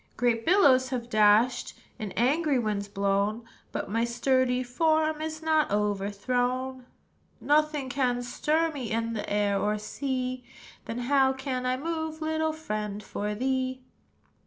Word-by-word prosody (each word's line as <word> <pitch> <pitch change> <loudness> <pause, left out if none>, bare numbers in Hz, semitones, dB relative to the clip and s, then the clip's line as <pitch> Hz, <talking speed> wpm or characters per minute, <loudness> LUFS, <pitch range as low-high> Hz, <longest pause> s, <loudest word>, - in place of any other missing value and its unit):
"Great 235 -2 +1
billows 275 -9 +5
have 245 -2 -4
dashed, 215 +4 +3 0.2
And 215 -3 -4
angry 285 - +2
winds 210 -4 -1
blown; 200 +3 0 0.3
But - - -3
my 230 +3 0
sturdy 250 +1 +1
form 310 +4 +1
Is 315 0 -5
not 315 -1 +2
overthrown. 245 +6 -1 0.5
"Nothing 300 -1 +1
can 250 -2 0
stir 310 +6 0
me 265 -7 -5
In 230 +1 -1
the 210 -2 -4
air 205 -1 +1
or 210 +1 0
sea; 255 +3 -3 0.4
Then, 230 - -5
how 265 0 +4
can 265 -1 -3
I 255 0 +1
move, 320 +1 -3
Little 315 0 0
friend, 210 -9 -4
for 210 +1 -3
thee?" 260 +1 -1
255 Hz, 135 wpm, -28 LUFS, 215-285 Hz, 0.5 s, billows